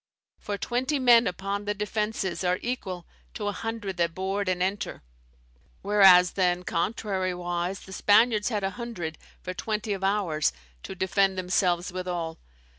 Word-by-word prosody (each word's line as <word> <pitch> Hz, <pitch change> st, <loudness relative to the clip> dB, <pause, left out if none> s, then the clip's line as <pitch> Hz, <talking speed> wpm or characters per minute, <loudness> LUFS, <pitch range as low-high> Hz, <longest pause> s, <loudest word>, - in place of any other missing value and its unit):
For, 205 Hz, -1 st, -4 dB
twenty 255 Hz, +7 st, -1 dB
men 245 Hz, -3 st, +6 dB
upon 195 Hz, +3 st, -3 dB
the 205 Hz, 0 st, -1 dB
defences 210 Hz, -2 st, -2 dB
are 180 Hz, 0 st, +2 dB
equal 190 Hz, -8 st, -4 dB, 0.3 s
to 210 Hz, -, -4 dB
a -, -, +1 dB
hundred 215 Hz, -2 st, -4 dB
that 170 Hz, -1 st, 0 dB
board 195 Hz, +1 st, -1 dB
and 180 Hz, -1 st, 0 dB
enter; 195 Hz, -, -3 dB, 0.8 s
whereas 190 Hz, -3 st, +7 dB
then, 180 Hz, -2 st, +1 dB
contrariwise, 180 Hz, -1 st, -2 dB
the 190 Hz, -, -10 dB
Spaniards 215 Hz, +2 st, +4 dB
had 210 Hz, -4 st, -2 dB
a 195 Hz, -, 0 dB
hundred, 175 Hz, -10 st, -5 dB, 0.2 s
for 185 Hz, -, -4 dB
twenty 215 Hz, +1 st, -2 dB
of 195 Hz, -1 st, -5 dB
ours, 190 Hz, -, +1 dB, 0.3 s
to -, -, -7 dB
defend 190 Hz, +1 st, +1 dB
themselves 180 Hz, 0 st, 0 dB
withall. 175 Hz, -3 st, -4 dB
195 Hz, 145 wpm, -27 LUFS, 180-210 Hz, 0.8 s, whereas